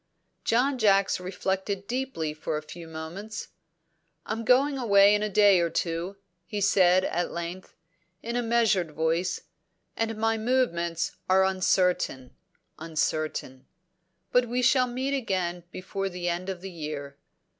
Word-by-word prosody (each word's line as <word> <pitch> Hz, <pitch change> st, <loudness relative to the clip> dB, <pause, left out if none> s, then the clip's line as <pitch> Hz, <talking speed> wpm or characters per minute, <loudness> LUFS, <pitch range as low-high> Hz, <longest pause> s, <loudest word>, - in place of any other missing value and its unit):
John 255 Hz, +3 st, +2 dB
Jacks 195 Hz, -4 st, +3 dB
reflected 190 Hz, +2 st, -3 dB
deeply 235 Hz, -10 st, -3 dB
for 155 Hz, 0 st, -3 dB
a 150 Hz, -, -6 dB
few 165 Hz, +2 st, -10 dB
moments. 170 Hz, +7 st, -7 dB, 0.8 s
"I'm 225 Hz, +1 st, -3 dB
going 270 Hz, +4 st, +3 dB
away 200 Hz, -4 st, +6 dB
in 210 Hz, -, +2 dB
a 215 Hz, -, -1 dB
day 200 Hz, -2 st, +5 dB
or 170 Hz, -1 st, +1 dB
two," 170 Hz, +4 st, -2 dB, 0.3 s
he 210 Hz, -, -3 dB
said 185 Hz, -2 st, +4 dB
at 175 Hz, +1 st, -1 dB
length, 170 Hz, +2 st, -6 dB, 0.5 s
in 235 Hz, +1 st, -3 dB
a 245 Hz, -, +1 dB
measured 220 Hz, -8 st, +2 dB
voice, 165 Hz, +3 st, 0 dB, 0.5 s
"and 225 Hz, -1 st, -2 dB
my 225 Hz, 0 st, +1 dB
movements 170 Hz, -9 st, 0 dB
are 190 Hz, +1 st, +5 dB
uncertain 180 Hz, -8 st, +1 dB, 0.4 s
uncertain. 155 Hz, -4 st, -2 dB, 0.6 s
But 250 Hz, 0 st, +3 dB
we 250 Hz, +1 st, 0 dB
shall 255 Hz, 0 st, +4 dB
meet 260 Hz, +3 st, -2 dB
again 180 Hz, -8 st, -2 dB
before 195 Hz, +2 st, -4 dB
the 180 Hz, -1 st, -5 dB
end 175 Hz, +2 st, -2 dB
of 185 Hz, -2 st, -5 dB
the 190 Hz, 0 st, -7 dB
year." 150 Hz, -4 st, -6 dB
190 Hz, 140 wpm, -27 LUFS, 170-225 Hz, 0.8 s, away